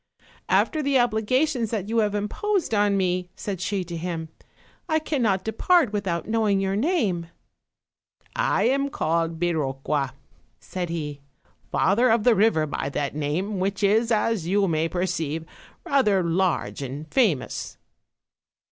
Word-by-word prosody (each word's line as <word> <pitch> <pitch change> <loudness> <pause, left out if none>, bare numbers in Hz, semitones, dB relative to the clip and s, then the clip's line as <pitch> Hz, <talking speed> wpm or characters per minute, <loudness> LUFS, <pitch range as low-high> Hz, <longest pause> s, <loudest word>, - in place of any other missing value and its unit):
"After 310 - +2
the 280 -2 +2
obligations 245 +2 +1
that 210 -4 -3
you 230 +1 +1
have 210 -1 +1
imposed 330 - -1
on 205 -1 +3
me," 180 -1 0
said 195 -4 -5
she 195 0 -1
to 175 -1 -7
him, 165 -1 -4 0.6
"I 315 - +3
cannot 235 -12 0
depart 235 - +2
without 190 -5 -2
knowing 215 -3 +2
your 195 0 0
name." 210 - 0 1.1
"I - - +1
am 275 +4 +2
called 165 - -1
Biroqua," 140 -4 -1 0.5
said 180 -2 -5
he, 150 -4 -4 0.5
"father 235 +6 +3
of 225 -1 +3
the 245 - +5
river 205 -6 +3
of 145 -1 -3
that 140 -1 -2
name, 165 +8 -2
which 195 +2 -1
is, 220 +4 +3
as 215 -5 +1
you 195 +2 +2
may 160 -1 0
perceive, 165 -3 -2 0.4
rather 210 -9 +3
large 170 -2 0
and 140 +3 -6
famous." 205 - 0
195 Hz, 140 wpm, -25 LUFS, 165-225 Hz, 1.1 s, the